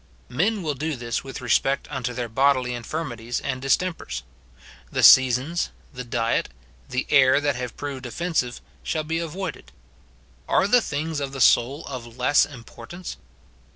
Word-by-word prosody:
Men 195 Hz, -, 0 dB
will 155 Hz, -2 st, -1 dB
do 150 Hz, +3 st, -3 dB
this 120 Hz, -1 st, -3 dB
with 135 Hz, 0 st, -7 dB
respect 135 Hz, +3 st, +1 dB
unto 130 Hz, -3 st, -3 dB
their 125 Hz, -1 st, -3 dB
bodily 130 Hz, +1 st, +2 dB
infirmi 125 Hz, +2 st, -4 dB
ties 120 Hz, +2 st, -3 dB
and 130 Hz, -2 st, -3 dB
distempers. 135 Hz, -, -1 dB, 0.7 s
The -, -, -1 dB
seasons, 130 Hz, +6 st, +6 dB, 0.2 s
the 125 Hz, -1 st, -6 dB
diet, 115 Hz, -1 st, 0 dB, 0.4 s
the 130 Hz, +2 st, -1 dB
air 130 Hz, 0 st, +6 dB
that 145 Hz, -2 st, 0 dB
have 125 Hz, -1 st, -5 dB
proved 140 Hz, -3 st, -5 dB
ofiensive 125 Hz, -2 st, -2 dB, 0.2 s
shall 155 Hz, -1 st, -2 dB
be 165 Hz, +2 st, -2 dB
avoided. 170 Hz, +4 st, -5 dB, 0.8 s
Are 195 Hz, -, +3 dB
the 245 Hz, +4 st, +5 dB
things 155 Hz, -2 st, -3 dB
of 140 Hz, -1 st, -4 dB
the 135 Hz, -, -6 dB
soul 130 Hz, +4 st, +3 dB
of 120 Hz, -3 st, -8 dB
less 130 Hz, +3 st, +4 dB
importance 135 Hz, +6 st, -9 dB
135 Hz, 155 wpm, -24 LUFS, 125-155 Hz, 0.8 s, seasons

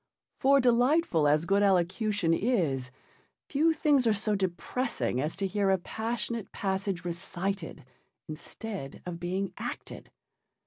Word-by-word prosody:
For 275 Hz, +1 st, +5 dB
delightful 245 Hz, -, +3 dB
as 150 Hz, +3 st, +3 dB
good 195 Hz, +3 st, +3 dB
elocution 190 Hz, -1 st, +2 dB
is, 165 Hz, -, 0 dB, 0.6 s
few 310 Hz, +3 st, +3 dB
things 290 Hz, -5 st, +3 dB
are 220 Hz, -, +4 dB
so 210 Hz, +1 st, +2 dB
depressing 190 Hz, -, -1 dB
as 150 Hz, +3 st, -2 dB
to 195 Hz, -, -2 dB
hear 200 Hz, 0 st, +1 dB
a 190 Hz, -, +4 dB
passionate 225 Hz, +3 st, -4 dB
passage 190 Hz, -2 st, -2 dB
recited 175 Hz, -1 st, -4 dB, 0.4 s
instead 160 Hz, 0 st, -6 dB
of 175 Hz, -1 st, -5 dB
being 185 Hz, +3 st, -2 dB
acted. -, -, -6 dB
195 Hz, 125 wpm, -29 LUFS, 170-230 Hz, 0.6 s, For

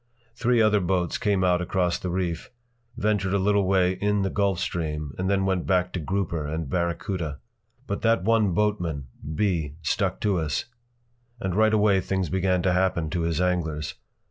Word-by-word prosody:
Three 120 Hz, +1 st, +2 dB
other 105 Hz, -1 st, +4 dB
boats 90 Hz, -2 st, 0 dB
came 100 Hz, -4 st, +1 dB
out 90 Hz, -1 st, +3 dB
across 90 Hz, -1 st, 0 dB
the 90 Hz, -, -4 dB
reef, 85 Hz, -2 st, -2 dB, 0.5 s
ventured 105 Hz, -4 st, +1 dB
a -, -, +4 dB
little 100 Hz, 0 st, +2 dB
way 95 Hz, -1 st, +3 dB
in 105 Hz, +1 st, 0 dB
the 95 Hz, -, -1 dB
Gulf 100 Hz, -3 st, +1 dB
Stream, 75 Hz, -5 st, -3 dB
and 95 Hz, +1 st, 0 dB
then 100 Hz, -1 st, +2 dB
went 95 Hz, -2 st, 0 dB
back 90 Hz, -1 st, +1 dB
to 90 Hz, -, -2 dB
grouper 85 Hz, -1 st, -2 dB
and 80 Hz, 0 st, -3 dB
barracuda. 85 Hz, -1 st, -2 dB, 0.5 s
But 100 Hz, -4 st, -3 dB
that 115 Hz, -3 st, +2 dB
one 110 Hz, -4 st, +2 dB
boatman, 85 Hz, -10 st, -1 dB, 0.3 s
B., 85 Hz, -8 st, 0 dB
stuck 95 Hz, +5 st, 0 dB
to 100 Hz, -4 st, +1 dB
us. 80 Hz, -2 st, -1 dB, 0.7 s
And 95 Hz, -6 st, -2 dB
right 110 Hz, +3 st, +4 dB
away 105 Hz, -3 st, +3 dB
things 95 Hz, 0 st, -1 dB
began 95 Hz, -1 st, +1 dB
to 90 Hz, -1 st, +2 dB
happen 90 Hz, -4 st, +1 dB
to 85 Hz, -, -1 dB
his 85 Hz, -1 st, 0 dB
anglers. 80 Hz, -5 st, -1 dB
95 Hz, 175 wpm, -25 LUFS, 85-100 Hz, 0.7 s, other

